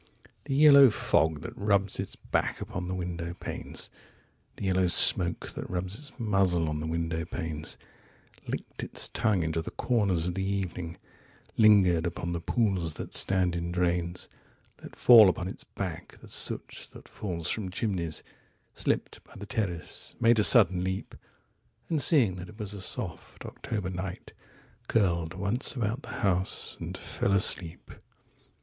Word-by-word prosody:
15The 135 -1 -1
yellow 140 -3 +8
fog 80 -7 +1
that - - -8
rubs 100 -1 0
its - - -4
back - - -2
upon 90 -1 -5
the 95 - -3
window 85 -1 -5
panes,16The 95 - -10
yellow 95 -1 +2
smoke 85 0 +5
that - - -7
rubs 90 +1 -3
its 140 +6 -7
muzzle 95 -7 +1
on 75 0 -2
the 80 - -4
window 80 0 -2
panes,17Licked 80 -2 -8
its - - -1
tongue 100 -6 +1
into 80 +1 -1
the - - -6
corners 100 -9 0
of 90 - -2
the 95 - -3
evening,18Lingered 95 0 0
upon 85 0 -4
the 85 - -2
pools 95 -8 0
that - - -7
stand 90 -2 +2
in 85 0 -3
drains,19Let 90 0 -5
fall 115 -5 +8
upon 90 0 -3
its - - -7
back - - -7
the - - -14
soot - - -4
that - - -13
falls 85 -5 -5
from 105 -4 -3
chimneys,20Slipped 90 -5 -4
by - - -19
the 100 - -8
terrace, 100 -9 -4
made 115 0 +4
a - - +4
sudden 95 -6 +6
leap,21And 95 - -6
seeing 125 - +5
that 90 0 -8
it 105 - -14
was 105 -2 -5
a 100 - -7
soft 95 -1 -5
October 105 -5 -5
night,22Curled 90 -1 -4
once 100 +9 -2
about 115 +2 -2
the - - -12
house, 95 -1 -1
and - - -6
fell 100 - -2
asleep. 95 -4 +1
95 Hz, 145 wpm, -28 LUFS, 85-105 Hz, -, yellow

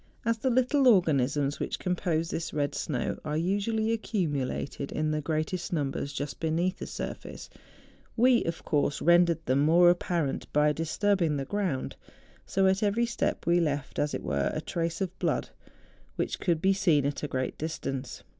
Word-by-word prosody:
As 230 0 +1
the 260 - +1
little 255 +2 +3
organisms 145 - +3
which - - -2
compose 170 -3 -1
this 165 -1 -4
red 145 -1 0
snow 125 -6 -2
are 150 0 -2
usually 205 +6 0
accumulated 145 - -2
in 155 0 -1
the 155 0 -1
greatest 160 +3 -2
numbers 140 -3 -2
just 145 0 -5
beneath 170 +3 0
the - - -5
surface, - - -7 0.7
we, 245 0 +5
of 165 0 -4
course, 145 -2 +1
rendered 170 0 +4
them 130 +2 +2
more 170 +4 +6
apparent 170 -5 -2
by 150 0 +3
disturbing 165 0 +1
the 135 - -3
ground; 185 -10 -2 0.5
so 195 0 +2
at 190 +1 +3
every 215 +3 +2
step 235 - -2
we 170 +1 +4
left, 145 -4 -2
as 145 - 0
it - - -5
were, 70 -2 0
a - - -2
trace 165 +1 -3
of 185 -1 -3
blood, - - -1 0.6
which - - -2
could 170 -3 0
be 195 +1 +5
seen 160 -7 +2
at 140 0 -2
a 150 - -2
great 130 -2 -2
distance. 135 -4 -4
165 Hz, 170 wpm, -28 LUFS, 145-190 Hz, 0.7 s, more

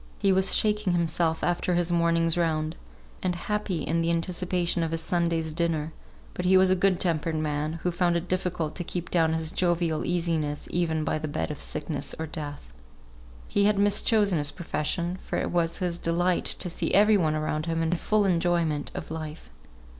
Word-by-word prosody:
He 195 -2 +3
was 190 0 +3
shaking 210 -3 +2
himself 165 -1 0
after 175 0 +1
his 175 0 +1
morning's 170 -1 +2
round, 160 -2 0 0.5
and 180 -1 0
happy 205 -1 -2
in 165 +1 0
the 165 - 0
anticipation 175 0 0
of 165 - 0
his 165 0 -2
Sunday's 165 -1 0
dinner; 160 -1 -1 0.4
but 180 - -4
he 185 +1 +5
was 185 0 +5
a - - +5
good 185 -1 +2
tempered 165 -2 0
man, 155 0 -1
who 180 - +1
found 175 0 +1
it 170 +1 -5
difficult 180 -4 -1
to 175 - -3
keep 175 0 -5
down 165 -2 +3
his 160 0 -2
jovial 175 -3 +1
easiness 165 -4 -1
even 160 -3 0
by 155 - -1
the 155 - -4
bed 145 - -2
of 150 - -7
sickness 150 -1 -3
or 160 - -3
death. 145 - -7 0.7
He 200 - +2
had 210 -1 +3
mischosen 205 -2 +3
his 145 -1 +2
profession; 175 +2 -3
for - - -3
it - - -2
was 170 -1 0
his 175 -2 -2
delight 175 +2 +1
to - - 0
see 175 - -2
every 210 +2 +6
one 160 -6 +2
around 155 +1 -2
him 165 0 0
in 160 - 0
full 205 +4 +1
enjoyment 170 -4 +1
of - - -6
life. 155 - -7
170 Hz, 190 wpm, -27 LUFS, 160-180 Hz, 0.7 s, every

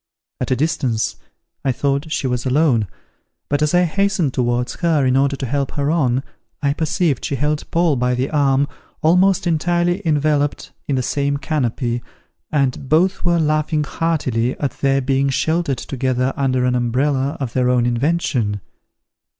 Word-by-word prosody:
At - - -2
a 130 - +2
distance, 125 -5 0 0.5
I 135 - +2
thought 140 +4 -1
she 145 - -1
was 125 -1 -1
alone; 130 -5 +2 0.6
but 145 +1 0
as 150 +3 +2
I 180 - +5
hastened 185 -4 +1
towards 120 -1 0
her 160 -5 +2
in 130 0 +2
order 140 +1 +2
to 135 - -4
help 140 +2 -2
her 145 0 0
on, 135 -6 +1 0.4
I 140 -1 +1
perceived 160 -1 0
she 140 - -1
held 150 +3 -1
Paul 165 -4 +2
by 125 0 +1
the 130 +2 -2
arm, 140 -2 +2 0.4
almost 185 +4 +4
entirely 175 +2 +1
enveloped 150 -2 0 0.2
in 140 - 0
the 130 - 0
same 140 +2 0
canopy, 125 -5 -1 0.5
and 135 -2 0
both 180 +5 +2
were 175 -1 +2
laughing 155 0 +1
heartily 135 -7 -1
at 140 - -1
their 135 0 +2
being 135 +1 +1
sheltered 160 0 0
together 130 0 -1
under 130 -3 +1
an 125 - +2
umbrella 130 +3 0
of 130 -4 -4
their 125 -1 +2
own 125 -1 +2
invention. 120 -4 0
140 Hz, 160 wpm, -19 LUFS, 125-155 Hz, 0.6 s, I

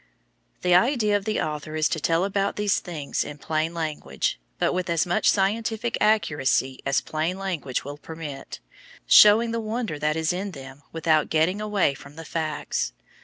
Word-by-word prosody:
The 180 - +3
idea 215 +1 +3
of 200 -1 -1
the 215 -1 0
author 155 0 -4
is 155 -1 +2
to 160 - -1
tell 165 +4 +1
about 200 0 -1
these 210 -1 +1
things 155 -6 -3
in 150 - -8
plain 155 +2 -1
language, 155 - -2 0.2
but - - +1
with 180 -1 -2
as 170 +1 +2
much 175 - +2
scientific 220 +3 0
accuracy 145 -10 +2
as 135 - +2
plain 160 +4 -2
language 175 -11 -3
will 145 +1 -7
permit, 155 -3 -8 0.5
showing 220 +3 +7
the 230 0 -2
wonder 220 -7 -3
that 150 +1 0
is 160 +1 0
in 190 +2 -4
them 135 -1 -10
without 160 -2 +1
getting 165 +6 +1
away 210 -8 +1
from 140 +1 -13
the 165 0 -9
facts. 155 -1 -2
165 Hz, 170 wpm, -25 LUFS, 150-205 Hz, 0.5 s, showing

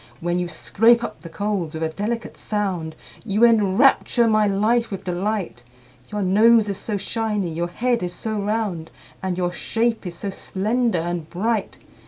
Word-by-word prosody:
When 175 +1 -1
you 175 - -1
scrape 225 +8 +3
up - - -6
the 170 - -9
coals 190 -4 -2
with 160 - -3
a 160 - 0
delicate 220 +7 -4
sound, 185 -7 -3 0.3
You 215 +1 +3
enrapture 230 +2 +4
my 215 -1 +3
life 220 +4 +2
with 195 - -6
delight, 185 - -3 0.5
Your 210 -1 -1
nose 215 +4 +5
is 200 - -3
so 210 -3 -2
shiny, 210 -3 -2
your 170 +2 -1
head 240 +6 0
is 180 -1 -2
so 220 -2 -3
round, 205 -6 -2 0.3
And 185 -2 -2
your 175 -1 0
shape 225 +3 -1
is 170 - -6
so 195 +3 -4
slender 220 +3 -1
and 170 -1 -3
bright! 215 +3 -1
205 Hz, 170 wpm, -22 LUFS, 175-225 Hz, 0.5 s, nose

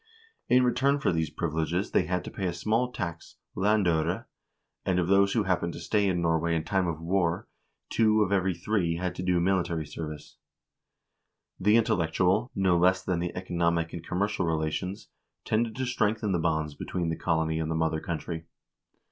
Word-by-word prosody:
In 125 +1 +5
return 135 +3 +2
for 140 - +1
these 80 -1 0
privileges 80 +3 -2
they - - +3
had 90 0 -1
to - - -7
pay 95 - -3
a 85 - -1
small 110 +8 0
tax, 85 -7 -6 0.2
landfire, 95 -4 +1 0.6
and 95 - +1
of 90 -1 +1
those 100 +1 +4
who 115 - +2
happened 90 -3 0
to - - -7
stay 105 -2 +1
in 90 -2 0
Norway 85 0 +1
in 80 - 0
time 95 0 0
of 80 -2 -3
war, 85 0 0 0.4
two 110 -1 +4
of 100 - -2
every 95 -2 +2
three 85 -1 0
had 90 +1 -2
to 90 - -6
do 90 -1 +2
military 85 -3 0
service. 75 0 -8 1.2
The 105 +4 +4
intellectual, 95 +2 +2
no 95 -3 +3
less 95 +1 +3
than 90 -2 -1
the 85 0 -3
economic 85 -2 0
and 85 - -6
commercial 95 0 -1
relations, 80 +4 -2 0.4
tended 110 0 0
to 130 0 -2
strengthen 110 -4 0
the 90 - +1
bonds 80 -2 0
between 85 +3 -3
the 80 - -1
colony 80 -1 0
and 80 -1 -2
the 80 - -1
mother 80 -1 0
country. 80 0 -5
90 Hz, 180 wpm, -28 LUFS, 80-100 Hz, 1.2 s, In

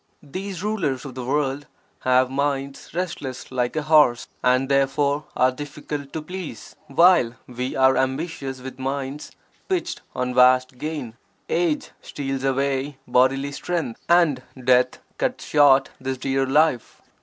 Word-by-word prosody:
These 185 +5 -6
rulers 165 - -1
of 135 - -7
the 130 0 -6
world 140 +1 -1 0.3
have 130 0 +3
minds 140 0 -2
restless 150 -8 -4
like 125 0 -1
a 155 - -1
horse 150 -6 +4
and 130 +1 +3
(therefore) 140 +2 +1
are 130 0 +4
difficult 145 0 -6
to 160 - -4
please, 180 +1 -8
while 155 -5 +4
we 125 +1 -4
are 130 0 +4
ambitious 135 -1 -2
with 130 0 -9
minds 135 +2 -4 0.4
pitched 360 -2 -1
on 125 0 -1
vast 125 0 +4
gain; 145 -7 -5 0.3
age 170 -3 0
steals 135 -2 -4
away 135 +1 0
bodily 130 +3 +2
strength 145 -5 -3
and 170 -7 +4 0.2
death 125 0 +3 0.2
cuts - - -1
short 140 -2 +5
this 130 0 -3
dear 135 +1 0
life. 150 -2 +1
135 Hz, 135 wpm, -23 LUFS, 130-150 Hz, 0.4 s, short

